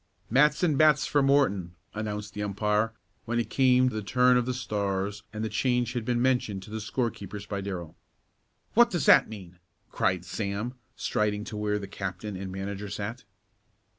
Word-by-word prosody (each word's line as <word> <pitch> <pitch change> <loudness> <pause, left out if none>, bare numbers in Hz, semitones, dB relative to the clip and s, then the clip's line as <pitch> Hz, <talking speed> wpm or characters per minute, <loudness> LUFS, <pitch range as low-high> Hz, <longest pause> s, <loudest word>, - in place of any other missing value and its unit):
"Matson 150 +4 +4
bats 150 -2 +5
for 145 - +2
Morton!" 100 -11 +2 0.2
announced 105 -1 -4
the 105 - -5
umpire 105 +2 0 0.3
when 120 +1 -1
it 115 - -3
came 130 -1 +4
the 110 -3 -4
turn 125 +4 +4
of 125 0 +2
the 130 - 0
Stars 100 -3 -2
and 110 0 -4
the - - 0
change 125 +1 0
had 120 -3 -3
been 120 0 +1
mentioned 120 -6 +1
to 105 - -12
the 110 0 -4
score 115 +2 -1
keepers 100 +1 -8
by 100 -1 -4
Darrell. 90 -5 -5 0.8
"What 240 +1 +6
does 175 - -1
that - - +7
mean?" 90 -5 -10 0.3
cried 90 -2 0
Sam, 100 +5 -3 0.2
striding 105 -1 0
to 110 - -7
where 105 0 0
the 100 - -5
captain 95 +1 -5
and 95 0 -5
manager 100 +1 -5
sat. 105 +5 -5
105 Hz, 175 wpm, -28 LUFS, 100-125 Hz, 0.8 s, that